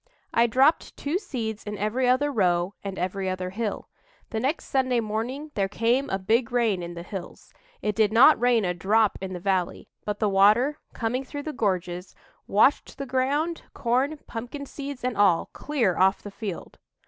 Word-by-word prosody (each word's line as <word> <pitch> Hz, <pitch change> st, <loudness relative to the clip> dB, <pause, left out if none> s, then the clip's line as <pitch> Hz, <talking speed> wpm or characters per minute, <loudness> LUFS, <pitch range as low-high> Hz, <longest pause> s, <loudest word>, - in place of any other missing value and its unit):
I 235 Hz, +1 st, +4 dB
dropped 265 Hz, +7 st, +2 dB
two 305 Hz, +6 st, -1 dB
seeds 225 Hz, -, -4 dB
in 210 Hz, 0 st, -5 dB
every 225 Hz, +6 st, 0 dB
other 285 Hz, +3 st, +2 dB
row 180 Hz, -5 st, +1 dB
and 195 Hz, -1 st, -5 dB
every 185 Hz, +1 st, -2 dB
other 185 Hz, 0 st, -3 dB
hill. 215 Hz, +1 st, -3 dB, 0.4 s
The 220 Hz, -, -1 dB
next 270 Hz, +8 st, -1 dB
Sunday 255 Hz, -2 st, +1 dB
morning 235 Hz, +7 st, -3 dB
there 195 Hz, -2 st, 0 dB
came 235 Hz, +7 st, +1 dB
a 195 Hz, -, 0 dB
big 225 Hz, +5 st, +1 dB
rain 230 Hz, -6 st, +1 dB
in 175 Hz, 0 st, -6 dB
the 170 Hz, -, -6 dB
hills 185 Hz, 0 st, -9 dB, 0.3 s
it 210 Hz, -1 st, 0 dB
did 215 Hz, -1 st, +3 dB
not 240 Hz, +4 st, +7 dB
rain 240 Hz, -4 st, +3 dB
a 180 Hz, -, 0 dB
drop 205 Hz, +5 st, +2 dB
in 190 Hz, -1 st, -4 dB
the 180 Hz, -, -5 dB
valley, 185 Hz, -1 st, -1 dB
but 210 Hz, -1 st, -3 dB
the 215 Hz, -, +1 dB
water, 210 Hz, +9 st, +4 dB
coming 245 Hz, +3 st, -2 dB
through 285 Hz, +2 st, -7 dB
the 310 Hz, -, -4 dB
gorges, 180 Hz, -4 st, -2 dB, 0.3 s
washed 220 Hz, +8 st, +3 dB
the 275 Hz, -, -4 dB
ground, 280 Hz, +6 st, 0 dB
corn, 260 Hz, +6 st, 0 dB
pumpkin 245 Hz, +5 st, -6 dB
seeds 280 Hz, -2 st, -7 dB
and 250 Hz, -2 st, -1 dB
all, 195 Hz, -5 st, +3 dB
clear 240 Hz, -, 0 dB
off 190 Hz, +2 st, +3 dB
the 205 Hz, -, -7 dB
field!" 200 Hz, -4 st, -7 dB
225 Hz, 185 wpm, -26 LUFS, 195-260 Hz, 0.4 s, not